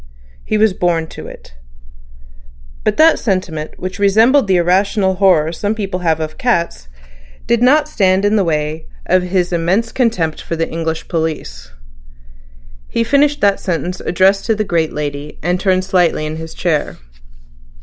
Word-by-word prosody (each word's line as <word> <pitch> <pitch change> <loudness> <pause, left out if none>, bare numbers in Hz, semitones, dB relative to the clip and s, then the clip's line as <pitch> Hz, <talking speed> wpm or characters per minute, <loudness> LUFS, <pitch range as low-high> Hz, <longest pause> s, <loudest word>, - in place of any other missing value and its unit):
He 215 - -1
was 215 -2 +3
born 175 -3 0
to - - -9
it. - - -13 1.3
But 215 - 0
that 320 +1 +5
sentiment, 185 -7 -3
which 185 +1 -6
resembled 220 +6 +4
the 190 - +3
irrational 190 +3 +2
horror 175 -5 +3
some 205 +5 -2
people 195 -4 -3
have 165 -3 0
of 155 -1 -5
cats, 170 - -1 0.6
did 235 0 +1
not 295 +5 +4
stand 195 -8 +1
in 205 +1 +2
the 205 - +3
way 155 -1 -2 0.2
of 185 0 +3
his 180 0 -1
immense 185 +7 0
contempt 185 -11 -1
for 165 - -4
the 165 0 -1
English 160 -1 -4
police. 155 - -4 1.2
He 230 - -1
finished 285 +4 +2
the 200 -1 +3
sentence 180 0 -3
addressed 195 +2 +1
to 225 - +2
the 215 - -1
great 170 -5 0
lady, 145 0 -5
and 175 +2 0
turned 185 -1 +1
slightly 180 -5 +1
in 155 +1 -5
his 160 0 -8
chair. 150 - -1
185 Hz, 160 wpm, -16 LUFS, 160-205 Hz, 1.3 s, that